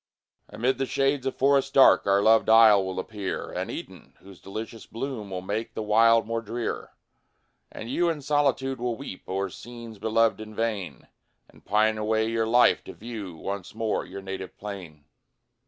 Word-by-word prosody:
Amid 125 +4 -1
the 135 - 0
shades 135 0 0
of 135 - -2
forests 140 0 +3
dark, 135 -5 +6
Our 100 0 +3
loved 110 +1 +4
isle 110 -3 +7
will 95 0 -4
appear 100 0 -5
An - - -4
Eden, - - -9
whose 95 -2 -15
delicious 110 +3 -7
bloom 115 -3 -5
Will 90 -1 -5
make 105 +4 -4
the 110 - -3
wild 115 +2 +4
more 115 +1 -2
drear. 115 +2 -4 0.8
And 110 - -8
you 170 +8 +1
in 155 -4 -3
solitude 135 -2 +1
will 120 -1 -1
weep 135 -9 -8
O'er 95 +1 -1
scenes 115 -1 -10
beloved 110 +1 +2
in 110 0 -9
vain, 100 - -3 0.4
And - - -21
pine 110 +1 +2
away 110 +1 +1
your 115 0 0
life 120 +2 +4
to - - -8
view 105 -6 -7
Once 100 +3 -6
more 110 -1 -1
your 100 - -9
native 95 -1 -7
plain. 90 -8 -8
110 Hz, 170 wpm, -26 LUFS, 100-120 Hz, 0.8 s, isle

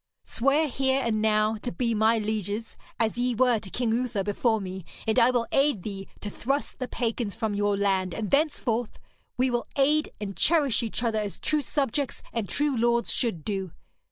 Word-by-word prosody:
Swear 275 +6 +2
here 265 0 +1
and 215 -2 0
now 215 0 +2
to 245 - -4
be 230 +6 0
my 220 +1 +3
lieges, 215 0 -2 0.2
as 225 +1 0
ye 245 0 +1
were 245 -1 +3
to 205 -2 -10
King 235 +2 0
Uther 235 -4 0
before 220 +3 +1
me, 190 -1 -6 0.2
and 220 +2 +3
I 235 +1 +6
will 245 -2 +1
aid 275 -9 +2
thee 195 -2 -6
to 205 - -4
thrust 275 +7 -2
the 255 - -2
pagans 230 -4 -2
from 220 -2 -1
your 205 0 +1
land, 190 -3 +1
and 215 -2 -3
thenceforth 265 -6 +1 0.4
we 255 0 +2
will 240 0 -1
aid 300 +3 +3
and 200 -2 -5
cherish 290 - +3
each 230 +1 -3
other 225 -2 +1
as 205 -2 -3
true 305 -1 +1
subjects 280 -1 -1
and 225 -5 -2
true 290 +4 +1
lords 235 0 +2
should 200 - -1
do. 195 -4 -3
230 Hz, 190 wpm, -27 LUFS, 210-255 Hz, 0.4 s, I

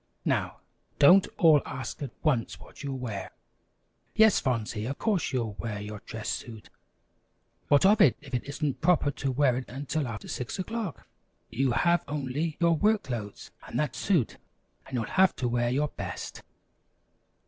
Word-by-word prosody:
Now - - -1 0.4
don't 185 +7 +7
all 155 -4 +6
ask 130 -4 -6
at 140 - -3
once 135 -8 0
what - - -14
you'll 140 -2 -4
wear. 110 -6 -5 0.9
Yes, 220 -2 +6
Fonsey, 115 -4 -2
of 140 - -4
course 200 -10 0
you'll 115 -5 -1
wear 105 -3 -3
your 105 0 -7
dress 110 -1 -6
suit. 110 -3 -5 1.0
What 145 +5 +5
of 210 +2 +5
it 135 - +6
if 140 -2 -14
it 125 - 0
isn't 140 -1 -3
proper 165 -4 +3
to 135 -1 -2
wear 130 -1 +3
it 130 - -6
until 140 +2 -3
after 110 -3 -6
six 125 - -4
o'clock? 200 - -4 0.5
You 130 -1 +1
have 170 +7 +3
only 145 +2 -2
your 170 -1 +4
work 210 +5 +2
clothes 110 -5 -6 0.2
and - - -4
that 150 - -1
suit 175 - +1 0.5
and 130 - -6
you'll 120 - 0
have 190 - +3
to 125 - -1
wear 120 0 +1
your 145 +4 +1
best." - - -6
140 Hz, 165 wpm, -28 LUFS, 120-165 Hz, 1.0 s, don't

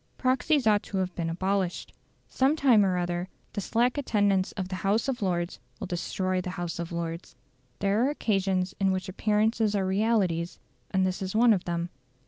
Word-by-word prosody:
Proxies 260 +2 +2
ought 210 -2 +4
to 195 - -5
have 185 -1 -1
been 170 -1 -2
abolished. 185 +1 -1 0.3
Some 270 +3 +2
time 255 -9 +5
or 185 -2 +1
other 175 +1 -2 0.2
the 205 - -2
slack 245 +7 +1
attendance 205 -7 +1
of 190 -2 -4
the 185 - -3
House 205 +6 +1
of 260 -3 -2
Lords 175 -2 -1 0.2
will - - -4
destroy 185 +1 -1
the 180 - -5
House 175 -2 -4
of 170 0 -4
Lords. 170 0 -5 0.4
There 200 +3 +1
are 265 - +3
occasions 195 -8 0
in 195 -1 +3
which 185 0 -2
appearances 215 +2 +1
are 195 -2 +1
realities, 190 -4 +1 0.3
and 190 -1 +2
this 185 0 -2
is 190 +1 -4
one 230 0 +6
of 185 - -2
them. 170 0 -2
190 Hz, 185 wpm, -27 LUFS, 180-215 Hz, 0.4 s, one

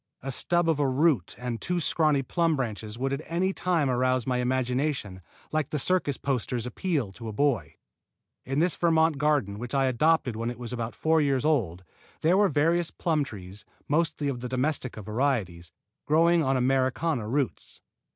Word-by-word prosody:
A 135 - -3
stub 175 +6 +1
of 160 -3 +2
a 145 - +2
root 130 - +1
and 125 -2 -4
two 180 0 -1
scrawny 155 -4 +2
plum 165 +4 +1
branches 110 -4 -4
would 135 +2 -1
at 140 - -3
any 185 +3 0
time 175 -7 +1
arouse 130 -1 +1
my 125 -1 0
imagination 125 -5 -1 0.3
like 155 -3 -1
the 150 - -2
circus 145 -2 0
posters' 125 -3 -2
appeal 135 - -2
to 115 +4 -9
a - - -4
boy. 140 0 0 0.7
In 135 +2 -3
this 170 +2 +2
Vermont 160 -3 +2
garden 140 -10 +1
which 120 +3 -5
I 135 -1 +3
adopted 130 0 +2
when 115 +1 -2
it 120 - -6
was 120 0 -6
about 115 -1 -4
four 160 0 +2
years 135 -3 +1
old, 100 - 0 0.4
there 165 +4 +4
were 200 0 +4
various 165 +4 +2
plum 160 -4 0
trees, 100 -5 -9 0.2
mostly 155 -1 0
of 135 -3 -2
domestica 125 -2 -2
varieties, 105 -8 -1 0.4
growing 165 +2 +4
on 135 -1 +1
Americana 130 0 +1
roots. 135 0 -2
135 Hz, 170 wpm, -27 LUFS, 120-155 Hz, 0.7 s, there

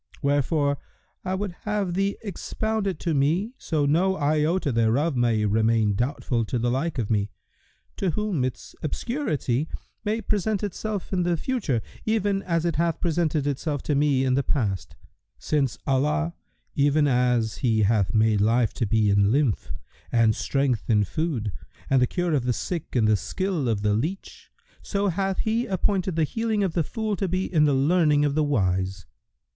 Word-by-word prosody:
Wherefore 145 0 +1 0.4
I 185 0 -1
would 195 0 -3
have 205 -4 -1
thee 195 +2 0
expound 220 +1 -2
it 185 -4 -2
to 170 - 0
me 165 - +1
so 155 -3 0
no 180 +6 +2
iota 155 +2 +1
thereof 120 +7 +2
may 115 -3 +2
remain 110 0 +2
doubtful 120 +1 -1
to 125 - -2
the 120 +1 0
like 145 +5 -1
of 115 -3 -1
me, 105 -1 +1 0.7
to 190 - 0
whom 190 -5 -1
its 130 -1 -4
obscurity 155 - -1 0.4
may 215 +2 0
present 210 -1 -1
itself 205 0 -4
in 185 - +2
the 175 -1 +1
future, 160 - -1 0.2
even 205 -3 +1
as 170 -3 -1
it 170 -3 0
hath 170 0 +1
presented 160 -3 0
itself 145 0 -2
to 150 - 0
me 140 -2 +2
in 130 - +2
the 135 - +3
past; 95 - -2 0.4
since 140 -5 0
Allah, 150 +5 +1 0.4
even 145 +1 +3
as 125 -4 +1
He 110 -4 +2
hath 100 -2 +2
made 110 -2 +3
life 115 +1 +2
to 115 - -1
be 105 -1 +2
in 100 0 +4
lymph[FN#116] 130 0 +1 0.4
and 115 -2 +3
strength 135 -5 -1
in 105 -2 +4
food 120 - -2 0.4
and 135 -1 +4
the 125 - +4
cure 175 +2 -1
of 135 -5 +1
the 125 - +1
sick 170 +6 -4
in 115 -3 +3
the 110 0 +4
skill 175 - -2
of 105 -3 -1
the 105 -1 +2
leach, 160 - -4 0.3
so 200 -1 -1
hath 190 +2 -1
He 230 +3 0
appointed 190 -2 0
the 165 - +2
healing 220 +5 0
of 185 -4 -1
the 170 - +1
fool 215 - -2
to 195 - -1
be 185 +2 -1
in 155 -4 +3
the 145 -2 +3
learning 150 +1 +3
of 145 - 0
the 155 +1 +2
wise. 95 - 0
145 Hz, 175 wpm, -25 LUFS, 120-185 Hz, 0.7 s, in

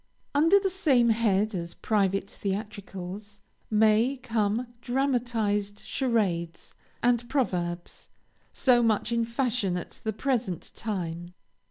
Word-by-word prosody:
Under 325 +7 +5
the 390 - 0
same 275 -11 +3
head 215 -2 +2
as 170 -2 -4
private 195 -2 +1
theatricals 200 0 -5 0.3
may 220 +5 +3
come 230 -2 0 0.2
dramatized 235 -6 0
charades 190 -10 -1 0.3
and 240 0 +2
proverbs, 180 -10 -2 0.4
so 250 -2 +4
much 225 -1 +1
in 235 -1 +1
fashion 230 -6 0
at 175 - -8
the 220 - 0
present 225 - -2
time. 175 -4 -4
220 Hz, 110 wpm, -27 LUFS, 195-245 Hz, 0.4 s, Under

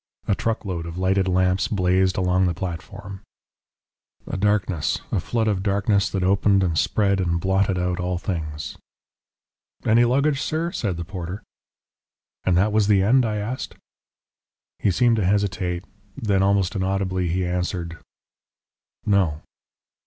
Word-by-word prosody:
A - - +3
truckload 95 -6 -2
of 85 +1 -7
lighted 95 +1 +1
lamps 95 +1 +2
blazed 95 -1 +1
along 90 0 +2
the 85 - -1
platform. 95 +2 -6 1.0
"A - - -5
darkness, 95 -5 +1
a - - +1
flood 110 +5 -1
of 100 -3 +1
darkness 100 0 +1
that 95 -2 -2
opened 100 +1 +3
and 85 -3 0
spread 100 +3 +2
and 85 -2 0
blotted 95 +1 +1
out 90 0 -1
all 90 0 -1
things." 80 -5 -5 1.1
"Any 115 +2 +5
luggage, 140 +4 +2
sir?" 165 +2 -1
said 100 - -2
the 85 - -5
porter. 95 +2 -6 1.0
"And 90 -2 +2
that 100 +4 +3
was 105 -2 +3
the 100 -2 +4
end?" 125 +4 +4
I 105 - -2
asked. 105 +5 -4 1.0
He - - +2
seemed 115 +5 +3
to 105 - +1
hesitate. 95 -2 0 0.3
Then, 100 -3 +1
almost 100 0 +2
inaudibly, 95 -1 -1
he 90 +2 0
answered, 90 -1 -3 1.1
"No." 90 -7 +1
95 Hz, 140 wpm, -23 LUFS, 90-105 Hz, 1.1 s, Any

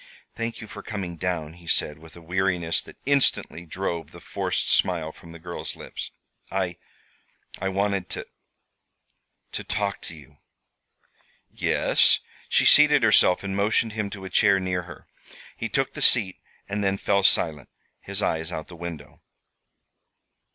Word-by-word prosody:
"Thank 115 0 -4
you 110 - -8
for - - -9
coming 95 -6 -5
down," 80 -3 -3
he 85 0 -16
said, 75 -1 +1
with 80 0 -15
a 85 - -13
weariness 90 -1 +1
that - - -14
instantly 135 -10 +2
drove 85 -3 -3
the - - -13
forced - - -2
smile 85 -4 +2
from 85 +1 -15
the 85 - -10
girl's 85 +1 -6
lips. - - -7 0.4
"I 95 -3 -2 0.8
I 95 - -1
wanted 100 -1 -1
to - - -5 1.3
to - - -4
talk 100 -2 -2
to 85 - -7
you." 75 -1 -16 1.1
"Yes?" - - +3 0.3
She - - +3
seated 150 -2 +7
herself 105 -4 +5
and 95 -1 -3
motioned 110 +2 +2
him 105 -2 -2
to 100 -1 -8
a - - -6
chair 100 -3 +4
near 90 -1 -1
her. 75 - -11 0.5
He - - -4
took - - 0
the - - -6
seat, 100 -7 +4 0.3
and 105 +1 -2
then 95 0 +1
fell 100 0 +2
silent, 80 -7 +2 0.3
his 100 +1 -2
eyes 80 +1 -1
out 80 - -6
the 90 - -10
window. 80 -4 -8
95 Hz, 155 wpm, -25 LUFS, 85-100 Hz, 1.3 s, seated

